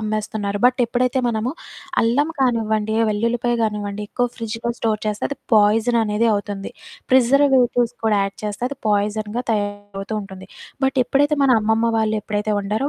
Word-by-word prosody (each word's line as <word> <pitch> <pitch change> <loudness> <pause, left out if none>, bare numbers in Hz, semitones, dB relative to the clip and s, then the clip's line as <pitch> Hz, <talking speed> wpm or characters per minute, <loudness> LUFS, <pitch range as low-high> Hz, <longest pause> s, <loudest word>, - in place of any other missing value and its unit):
అమ్మేస్తున్నారు. 215 -1 -2
బట్ 250 0 +5
ఎప్పుడైతే 250 +2 0
మనము, 230 +1 -1 0.5
అల్లం 255 +7 +2
కానివ్వండి, 220 -3 +1
వెల్లుల్లిపాయ 235 +3 0
గానివ్వండి, 210 -1 -2
ఎక్కువ 245 +2 0
ఫ్రిడ్జులో 230 +1 -4
స్టోర్ 215 -2 -1
చేస్తే, 210 0 -2
అది 280 - -5 0.2
పాయిజననేది 220 +1 +3
అవుతుంది. 205 -1 -3 0.4
ప్రిజర్వేటివ్స్ 255 -2 +3
కూడా 210 -2 +3
యాడ్ 195 0 -4
చేస్తే, 210 +2 -5
అది 280 - -7
పాయిజన్‌గా 210 +3 0
తయారవుతూ 205 -1 -3
ఉంటుంది. 190 -1 -10 0.4
బట్ 265 0 +1
ఎప్పుడైతే, 290 +4 +2
మన 275 - +4
అమ్మమ్మ 220 +2 +1
వాళ్ళు 220 0 +1
ఎప్పుడైతే 210 0 -2
వండారో, 215 +8 -1
220 Hz, 140 wpm, -21 LUFS, 210-245 Hz, 0.5 s, బట్